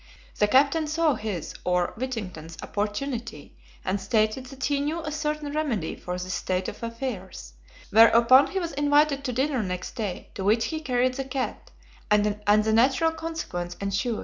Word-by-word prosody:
The 210 - +4
captain 280 +7 +3
saw 310 0 +2
his, 210 -9 -4
or 180 -1 +1
Whittington's, 185 -10 -5
opportunity, 230 +4 -4 0.3
and 190 +1 -1
stated 215 +5 +1
that 265 0 -9
he 285 -1 +1
knew 310 +4 -2
a 305 - -4
certain 300 -1 -2
remedy 265 - -1
for 180 - -5
this 185 +1 -4
state 185 0 -1
of - - -7
affairs; 230 - -6 0.4
whereupon 230 +4 +7
he 390 - -4
was 340 -2 -3
invited 290 0 +2
to 255 - -1
dinner 265 +1 0
next 180 -2 -4
day, 210 -5 -4
to 195 - -5
which 220 +3 +3
he 315 - -3
carried 255 -3 +1
the 270 +1 -4
cat, 260 -1 -4 0.4
and 210 0 +4
the 210 +1 +2
natural 265 +8 +4
consequence 320 - -5
ensued. 200 +4 -1
240 Hz, 165 wpm, -26 LUFS, 205-285 Hz, 0.4 s, whereupon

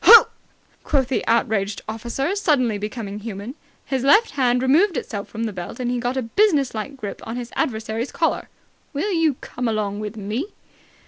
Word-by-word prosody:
"Ho!" 465 - +10 0.5
quoth 270 -4 +1
the 265 - 0
outraged 215 -3 +1
officer, 240 - -2
suddenly 255 - +2
becoming 210 -1 -5
human. 210 +2 -6 0.3
His 265 -2 -1
left 415 +12 +5
hand 250 -2 +2
removed 320 +6 +4
itself 205 -4 -4
from 225 - -5
the 220 -2 -2
belt, 180 +4 -7
and 245 -1 -1
he 245 - 0
got 245 +2 -1
a 260 - 0
businesslike 275 - +1
grip 210 -5 -6
on 225 - -5
his 245 -1 -6
adversary's 220 +1 -1
collar. - - 0 0.4
"Will 320 +9 -1
you 325 -5 +2
come 245 -1 -4
along 210 -2 -1
with 215 +1 -5
me!" 215 - -3
245 Hz, 175 wpm, -22 LUFS, 215-275 Hz, 0.5 s, Ho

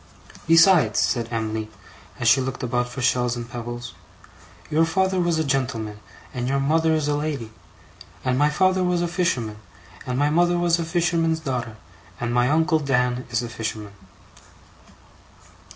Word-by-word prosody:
'Besides,' 165 - +5
said 115 +5 0
Em'ly, 110 -1 -3 0.5
as 120 - 0
she 130 +3 +5
looked 130 -1 -4
about 125 0 -1
for 125 +1 -5
shells 125 -1 +1
and 120 -1 -6
pebbles, 120 0 -7 0.8
'your 155 +2 +3
father 190 +3 +1
was 175 -2 +1
a 160 - +1
gentleman 125 -7 -2 0.3
and 125 -1 -3
your 140 +1 +1
mother 160 +3 +2
is 155 -2 -1
a 150 - +1
lady; 145 -7 -3 0.7
and 130 -1 +1
my 145 +3 +3
father 185 +4 +2
was 180 -1 +1
a - - 0
fisherman 150 - -1 0.5
and 125 0 -2
my 145 +2 +2
mother 175 +2 +3
was 175 -1 +2
a 165 - -2
fisherman's 165 -1 +1
daughter, 125 -7 -4 0.4
and 120 0 -2
my 125 +1 +3
uncle 160 +2 +2
Dan 125 -3 0
is 120 0 -1
a - - -4
fisherman. 110 -2 -5
135 Hz, 160 wpm, -23 LUFS, 120-165 Hz, 0.8 s, Besides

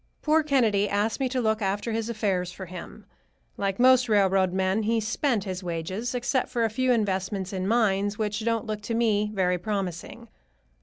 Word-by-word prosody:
Poor 310 +1 +4
Kennedy 230 -9 +2
asked 205 +4 0
me 265 -2 0
to 255 0 -1
look 220 -2 0
after 205 +3 -1
his 225 +1 -2
affairs 195 -6 -1
for 190 +1 -8
him. 180 0 -10 0.5
Like 195 0 -2
most 255 -1 +5
railroad 195 -3 +3
men 190 +3 0
he 225 +2 +1
spent 220 +1 0
his 185 -2 -5
wages, 185 +8 -3
except 250 +2 0
for 235 - -1
a 225 - +1
few 255 +3 +1
investments 195 -3 -1
in 185 0 -2
mines 205 -2 +1
which 210 0 -2
don't 230 -1 0
look 215 -1 -4
to 225 +2 -3
me 210 -3 +1
very 180 -3 0
promising. 195 +3 -4
210 Hz, 185 wpm, -26 LUFS, 190-230 Hz, 0.5 s, most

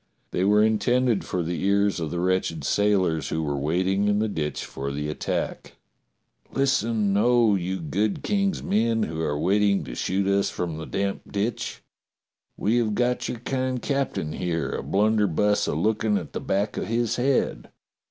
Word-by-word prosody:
They 90 - 0
were 105 +2 +5
intended 115 +1 +2
for 90 - -2
the 85 +2 -3
ears 100 -1 +2
of 80 -2 -2
the 85 - -3
wretched 90 -4 0
sailors 90 -5 +1
who 80 - -1
were 70 -2 -1
waiting 90 +8 +1
in 105 0 +2
the 110 +1 +1
ditch 75 -7 -3
for 70 +1 -5
the 75 +1 -3
attack: 75 - -3 0.8
"Listen, 115 -6 +1
oh, 120 0 +4
you 95 0 -1
good 100 +7 -1
King's 195 -3 0
men 115 +1 +1
who 80 -2 -3
are 75 -2 -1
waiting 100 +3 +2
to 65 -4 -7
shoot 95 +9 -1
us 100 0 +2
from 85 -3 -4
the 80 - -6
damp 100 0 -3
ditch. 115 +3 -3 0.7
We 110 +4 +1
have 110 -3 +1
got 125 +2 0
your 120 - -5
kind 130 0 -1
captain 135 - -2
here, 85 -5 -2
a - - -3
blunderbuss 105 -1 +2
a - - -1
looking 105 +4 +1
at - - -6
the - - -3
back 100 +2 -1
of - - -2
his 115 0 0
head. 125 - 0
100 Hz, 170 wpm, -25 LUFS, 85-110 Hz, 0.8 s, were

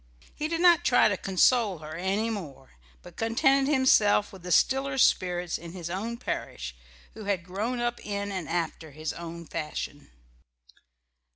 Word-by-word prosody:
He 305 - -3
did 330 +1 -2
not 345 -1 +6
try 245 - +5
to 200 - 0
console 195 +2 +2
her 155 0 -9
any 195 +7 -1
more, 150 -11 -7 0.3
but - - -14
contented 270 +5 +2
himself 215 -7 +4
with 190 - -11
the 180 +1 -6
stiller 270 - +2
spirits 180 -7 +2
in 170 0 -9
his 170 -2 -6
own 225 +6 -3
parish, - - -5 0.4
who 215 - -9
had 195 -4 -1
grown 215 +7 -3
up 240 0 -2
in 200 -1 -3
and 185 -5 -4
after 165 -2 -2
his 155 +1 -5
own 170 0 -8
fashion. 150 -2 -5
195 Hz, 160 wpm, -27 LUFS, 170-240 Hz, 0.4 s, not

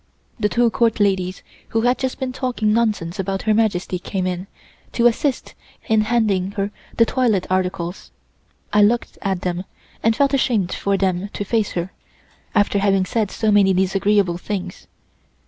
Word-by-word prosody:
The 210 -1 +1
two 235 0 +2
Court 230 -1 +1
ladies 190 -2 0 0.3
who 225 - +1
had 245 +2 +2
just 260 -1 -2
been 260 -2 -3
talking 245 -5 0
nonsense 210 -6 0
about 195 0 -2
Her 220 - +2
Majesty 200 -4 0
came 185 +1 -3
in, 185 +1 -3 0.5
to 235 - +1
assist 245 +3 +1 0.3
in 220 -1 +3
handing 210 -4 +1
her 200 -1 -2 0.3
the 230 - +6
toilet 225 -6 +1
articles. 185 -1 -2 0.6
I 210 - +5
looked 230 +4 +1
at 190 -2 -1
them, 180 0 -2 0.4
and 225 0 +2
felt 280 +2 +2
ashamed 230 -9 +1
for 200 0 0
them 190 0 0
to - - -3
face 220 0 0
her, 175 +2 -3 0.6
after 205 -1 +3
having 195 -1 +2
said 215 0 -1
so 220 +1 0
many 195 -2 +4
disagreeable 190 -1 +2
things. 185 -2 -5
205 Hz, 165 wpm, -21 LUFS, 185-225 Hz, 0.6 s, the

